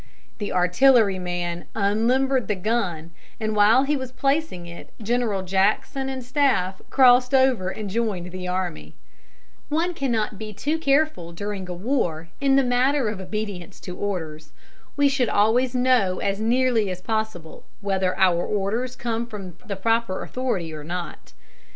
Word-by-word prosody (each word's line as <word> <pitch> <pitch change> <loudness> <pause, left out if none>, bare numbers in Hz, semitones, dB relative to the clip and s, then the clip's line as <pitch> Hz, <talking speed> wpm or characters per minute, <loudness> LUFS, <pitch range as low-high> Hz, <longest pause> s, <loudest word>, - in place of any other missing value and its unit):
The 205 - -3
artilleryman 180 -4 +2
unlimbered 235 +5 +1
the 210 - 0
gun, 180 -5 -2 0.3
and 215 -1 -2
while 215 +5 +5
he 295 +2 +1
was 260 -2 -5
placing 275 - -1
it 170 0 -10
General 225 -3 0
Jackson 195 +8 0
and 260 -1 -4
staff 245 -8 +1
crossed 250 0 +5
over 260 -8 +3
and 210 +2 -5
joined 195 -4 -2
the 185 0 -6
army. 180 - -4 0.7
One 330 +4 0
cannot 225 - -1
be 215 -1 -6
too 300 +10 -1
careful, 280 - +1
during 195 0 -5
a - - -3
war, 175 - -1
in 275 -1 +4
the 275 - +5
matter 255 0 +2
of 205 -3 -5
obedience 200 -2 -5
to 180 - -7
orders. 160 -7 -5 0.4
We 285 0 +5
should 270 -4 +1
always 240 +5 +2
know 245 -7 +3
as 200 +1 -1
nearly 235 -2 +2
as 185 -1 -4
possible 220 -6 -4 0.2
whether 190 -2 0
our 175 -2 +3
orders 220 +5 -2
come 235 -2 -3
from 195 -6 -8
the 200 - -3
proper 225 -1 0
authority 220 -11 -3
or 150 -1 -7
not. 175 +1 -6
215 Hz, 150 wpm, -24 LUFS, 185-255 Hz, 0.7 s, while